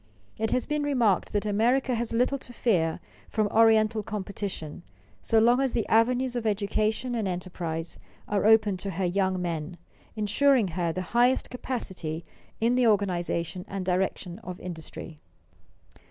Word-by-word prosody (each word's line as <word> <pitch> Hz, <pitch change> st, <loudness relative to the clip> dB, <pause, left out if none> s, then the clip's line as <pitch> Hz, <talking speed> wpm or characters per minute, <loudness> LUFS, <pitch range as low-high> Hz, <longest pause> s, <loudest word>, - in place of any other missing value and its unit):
It 220 Hz, 0 st, 0 dB
has 250 Hz, -, +1 dB
been 300 Hz, -1 st, -1 dB
remarked 245 Hz, -10 st, +1 dB
that 205 Hz, 0 st, -1 dB
America 240 Hz, +5 st, +2 dB
has 235 Hz, 0 st, -1 dB
little 250 Hz, +4 st, +1 dB
to 245 Hz, -, -12 dB
fear 180 Hz, -10 st, +1 dB, 0.3 s
from 215 Hz, -1 st, +1 dB
Oriental 220 Hz, 0 st, +4 dB
competition 200 Hz, -6 st, -5 dB, 0.4 s
so 225 Hz, -, +2 dB
long 240 Hz, +4 st, +5 dB
as 265 Hz, -3 st, 0 dB
the 230 Hz, -, 0 dB
avenues 245 Hz, +3 st, +3 dB
of 235 Hz, -2 st, -1 dB
education 215 Hz, +4 st, 0 dB
and 225 Hz, -4 st, -1 dB
enterprise 175 Hz, -2 st, -4 dB, 0.3 s
are 205 Hz, 0 st, +1 dB
open 215 Hz, -3 st, +5 dB
to 195 Hz, +2 st, -4 dB
her 190 Hz, 0 st, -2 dB
young 190 Hz, +1 st, 0 dB
men, 170 Hz, -1 st, -4 dB, 0.4 s
insuring 220 Hz, +2 st, +3 dB
her 170 Hz, 0 st, -1 dB
the 185 Hz, +3 st, -3 dB
highest 245 Hz, +2 st, +3 dB
capacity 185 Hz, -11 st, -4 dB, 0.4 s
in 230 Hz, +2 st, +2 dB
the 250 Hz, -1 st, +3 dB
organization 180 Hz, -3 st, 0 dB
and 195 Hz, -2 st, -4 dB
direction 185 Hz, 0 st, -1 dB
of 180 Hz, -5 st, -8 dB
industry. 165 Hz, -2 st, -8 dB
210 Hz, 150 wpm, -27 LUFS, 180-235 Hz, 0.4 s, long